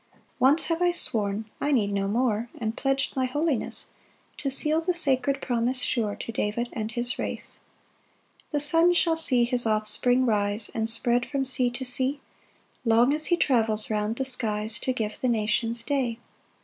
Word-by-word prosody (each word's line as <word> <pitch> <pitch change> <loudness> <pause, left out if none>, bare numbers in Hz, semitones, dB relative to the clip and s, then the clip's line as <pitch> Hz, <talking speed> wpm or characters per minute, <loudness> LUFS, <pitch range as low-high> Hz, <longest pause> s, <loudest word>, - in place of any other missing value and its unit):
4 - - -30 0.2
"Once 275 +6 +5
have 330 0 -2
I 355 - +3
sworn 220 -10 -1 0.2
(I 290 - 0
need 215 -7 +1
no 195 0 -1
more) 230 +1 -1
"And 225 -1 -3
pledg'd 270 0 -1
my 260 -1 0
holiness 290 -1 -2 0.5
"To 275 - -3
seal 305 +4 +5
the 355 +2 -1
sacred 275 -4 +2
promise 245 +1 -1
sure 215 -4 -1
"To - - -7
David 225 +2 -2
and 220 -1 -4
his 240 +1 -4
race. - - -4 0.9
5 - - -41
"The 295 - +1
sun 330 +4 +4
shall 335 -1 +2
see 260 -7 +3
his 240 -1 +1
offspring 220 +4 +1
rise 210 -1 +2
"And 225 -1 -1
spread 240 +2 +2
from 275 +1 -3
sea 255 -1 +3
to 245 +2 -7
sea, 260 +3 -1 0.6
"Long 235 +3 +3
as 305 0 +3
he 345 - +2
travels 220 -8 0
round 210 +1 -1
the 265 - -3
skies 220 -4 0
"To 260 - -2
give 220 -4 -4
the 255 - 0
nations 230 +1 -1
day. 255 -4 -2
245 Hz, 180 wpm, -25 LUFS, 220-275 Hz, 0.9 s, Once